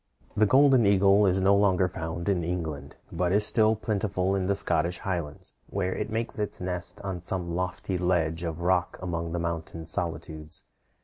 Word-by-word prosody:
The 110 0 +4
golden 135 0 +5
eagle 100 +1 +5
is 95 +1 +2
no 100 +1 +5
longer 95 -2 +3
found 80 0 -5
in 95 -4 +1
England, 80 -5 -4 0.2
but 90 +1 0
is 105 +2 +5
still 110 0 +4
plentiful 100 -3 -1
in 95 -1 -1
the 100 - +2
Scottish 85 -2 0
Highlands, 85 -7 -4 0.2
where 95 -2 -1
it - - -3
makes 115 +2 -2
its 105 - -2
nest 90 -1 -3
on 95 -3 -4
some 90 -1 -2
lofty 90 +1 -2
ledge 85 -2 +1
of 85 -1 -4
rock 90 0 +1
among 85 -2 -3
the 85 - -2
mountain 85 -1 -4
solitudes. 80 -3 -4
90 Hz, 175 wpm, -27 LUFS, 85-100 Hz, 0.2 s, golden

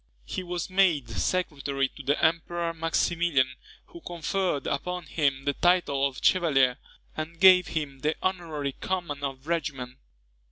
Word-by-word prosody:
He 185 - -4
was 175 -2 -4
made 175 -10 +2
secretary 140 - -1
to - - -11
the 145 +2 +1
Emperor 170 +1 0
Maximilian, 165 -3 +1 0.4
who 340 - -13
conferred 175 - -2
upon 180 +5 -2
him 140 -4 0
the 140 - +1
title 160 -5 +2
of 135 - -7
chevalier, 135 -9 +3 0.4
and 160 +2 -6
gave 185 -1 +7
him 145 -4 -4
the 150 +3 0
honorary 165 -7 -2
command 170 -7 -3
of 135 -1 -4
a - - -10
regiment. 140 -6 -3
160 Hz, 145 wpm, -27 LUFS, 140-175 Hz, 0.4 s, gave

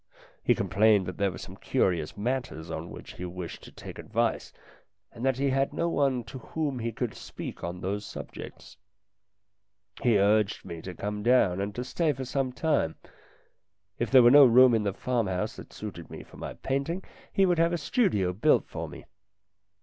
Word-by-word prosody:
He - - +4
complained 105 -2 +3
that 90 0 -6
there 100 -1 +2
were - - -7
some - - -9
curious 85 -3 0
matters 105 -8 -3
on 80 +1 -5
which - - -10
he 90 - -6
wished 90 -1 -7
to - - -12
take - - -10
advice, - - -1 0.6
and 115 - -9
that 135 -1 +2
he 140 0 +1
had 135 +1 +1
no 170 - 0
one 135 -6 +1
to 130 +4 -9
whom 145 +1 -3
he 115 0 -2
could 115 0 -3
speak - - -8
on 85 +1 -4
those 100 +3 -2
subjects. - - -9 1.2
He 120 -4 +4
urged 105 +1 +2
me 85 -3 -7
to 90 +1 -7
come 105 +3 -4
down 105 -6 +3
and 100 +1 -3
to 125 - -3
stay 155 +4 0
for 130 0 -5
some 130 0 -1
time. 125 - 0 1.0
If 120 - 0
there 130 -2 +7
were 120 - +7
no 145 0 +10
room 125 +1 +7
in 110 - +3
the 100 - +1
farmhouse 110 -4 -1
that - - -11
suited 95 -6 -8
me - - -8
for - - -16
my - - -6
painting 140 +8 -2 0.3
he 195 - +3
would 175 -3 +2
have 165 +1 +4
a 175 - 0
studio 145 - +1
built 100 - +3
for - - -5
me. - - -11
115 Hz, 190 wpm, -28 LUFS, 95-135 Hz, 1.2 s, no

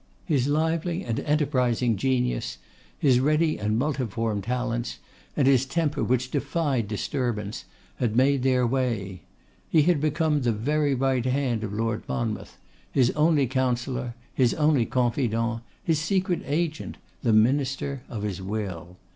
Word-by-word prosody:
His 140 -6 +1
lively 160 +3 0
and 115 -2 -1
enterprising 125 -6 +1
genius, 125 - 0 0.4
his 130 -4 +4
ready 155 +3 +2
and 105 +1 0
multiform 115 -6 -1
talents, 120 +2 -2 0.4
and 140 - +3
his 135 -2 +5
temper 145 +1 -1
which 130 +1 0
defied 145 -5 0
disturbance, 105 0 -3 0.3
had 115 -3 0
made 135 +2 +3
their 130 -1 +3
way. 115 -8 -1 0.5
He 155 -3 +5
had 165 -2 +2
become 155 0 +1
the 120 -2 +1
very 145 +6 +1
right 130 -1 +1
hand 130 -3 0
of 105 - -3
Lord 110 +1 -1
Monmouth; 110 -3 -3 0.3
his 130 -2 +3
only 150 -2 +3
counsellor, 125 -1 -1 0.2
his 125 -3 +2
only 150 -6 +3
confidant; 115 -2 0 0.2
his 165 -5 +1
secret 185 +1 0
agent; 155 +1 -2 0.2
the 120 - +2
minister 135 +4 +2
of 105 -3 -5
his 100 -3 -3
will. 95 -3 -5
130 Hz, 140 wpm, -26 LUFS, 115-145 Hz, 0.5 s, his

